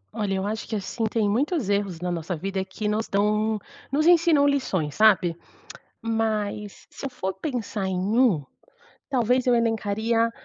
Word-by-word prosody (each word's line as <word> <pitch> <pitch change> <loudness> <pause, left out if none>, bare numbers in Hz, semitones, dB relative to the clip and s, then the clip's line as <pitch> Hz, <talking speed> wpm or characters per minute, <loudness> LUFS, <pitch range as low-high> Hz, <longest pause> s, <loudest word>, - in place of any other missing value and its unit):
Olha, 205 -3 -1
eu 190 +1 -2
acho 215 +2 -3
que, 220 - -3
assim, 215 +3 -3
tem 215 -1 +1
muitos 260 - 0
erros 200 -4 0
na 180 0 -2
nossa 170 +1 -3
vida 190 +3 -2
que 190 +3 -5
nos 215 +1 0
dão 210 +2 +1 0.3
nos 300 +3 +2
ensinam 335 -4 +5
lições, 190 - 0
sabe? 195 -5 +4 0.7
Mas 215 -2 -2
se - - -10
eu 275 - -2
for 190 -6 -4
pensar 220 -3 -3
em 190 -1 -1 0.2
um, 220 - +4 0.7
talvez 250 -1 +2
eu 245 -1 +4
elencaria 225 0 +1
215 Hz, 160 wpm, -25 LUFS, 195-240 Hz, 0.7 s, ensinam